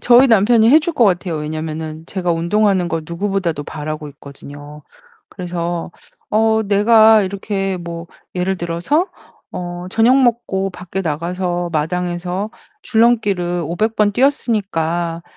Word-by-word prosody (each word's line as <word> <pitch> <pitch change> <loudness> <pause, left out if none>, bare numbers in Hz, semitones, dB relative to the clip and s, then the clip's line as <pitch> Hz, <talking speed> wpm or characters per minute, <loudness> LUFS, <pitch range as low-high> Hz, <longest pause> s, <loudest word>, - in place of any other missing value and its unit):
저희 245 +2 +6
남편이 225 +1 +4
해 300 - +8
줄 325 +2 -3
것 245 - +4
같아요. 180 -4 +1
왜냐면은 155 +1 -5
제가 180 -2 -2
운동하는 185 +3 +1
걸 165 -1 -2
누구보다도 170 -3 -2
바라고 155 0 -6
있거든요. 145 +1 -12 0.5
그래서 175 -2 -4 0.4
어 220 +1 +2
내가 215 +1 +5
이렇게 195 0 -3
뭐 170 -1 -7 0.3
예를 185 +2 0
들어서 175 - -1 0.4
어 175 0 -6
"저녁 245 +6 +4
먹고 225 -6 0
밖에 180 +1 -6
나가서 175 +2 -2
마당에서 180 +5 -2 0.3
줄넘기를 205 -7 +1
500 215 +8 -1
번 210 -1 +2
뛰었으니까 175 - 0
180 Hz, 285 characters per minute, -18 LUFS, 170-215 Hz, 0.5 s, 해